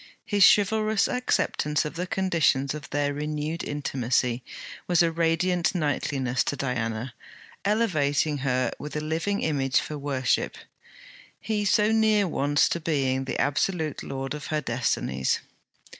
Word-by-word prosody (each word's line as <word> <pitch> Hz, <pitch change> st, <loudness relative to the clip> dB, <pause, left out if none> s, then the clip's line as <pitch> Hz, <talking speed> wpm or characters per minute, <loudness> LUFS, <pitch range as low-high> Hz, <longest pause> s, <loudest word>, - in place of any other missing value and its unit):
His 205 Hz, -2 st, +3 dB
chivalrous 215 Hz, +1 st, +2 dB
acceptance 200 Hz, -, 0 dB
of 150 Hz, -, -4 dB
the 175 Hz, +2 st, -4 dB
conditions 165 Hz, -8 st, +1 dB
of 150 Hz, -4 st, -8 dB
their 145 Hz, 0 st, 0 dB
renewed 150 Hz, +2 st, -3 dB
intimacy 125 Hz, -3 st, -1 dB, 0.4 s
was 175 Hz, -1 st, +4 dB
a 165 Hz, -, +2 dB
radiant 170 Hz, +2 st, +1 dB
knightliness 140 Hz, -5 st, 0 dB
to -, -, -1 dB
Diana, 120 Hz, -2 st, -3 dB, 0.5 s
elevating 155 Hz, -9 st, +1 dB
her 130 Hz, -2 st, 0 dB
with 150 Hz, +1 st, -7 dB
a -, -, 0 dB
living 165 Hz, +6 st, -1 dB
image 135 Hz, -4 st, +1 dB
for 150 Hz, -1 st, -5 dB
worship: 135 Hz, -3 st, 0 dB, 0.8 s
he 210 Hz, -2 st, -2 dB
so 210 Hz, +2 st, +3 dB
near 215 Hz, -2 st, +3 dB
once 145 Hz, -2 st, +2 dB
to 170 Hz, -, -1 dB
being 135 Hz, -5 st, 0 dB
the 130 Hz, -, -3 dB
absolute 155 Hz, +1 st, 0 dB
lord 135 Hz, 0 st, -4 dB
of 150 Hz, -1 st, -6 dB
her 155 Hz, -, 0 dB
destinies! 120 Hz, -, -1 dB
150 Hz, 135 wpm, -26 LUFS, 135-180 Hz, 0.8 s, was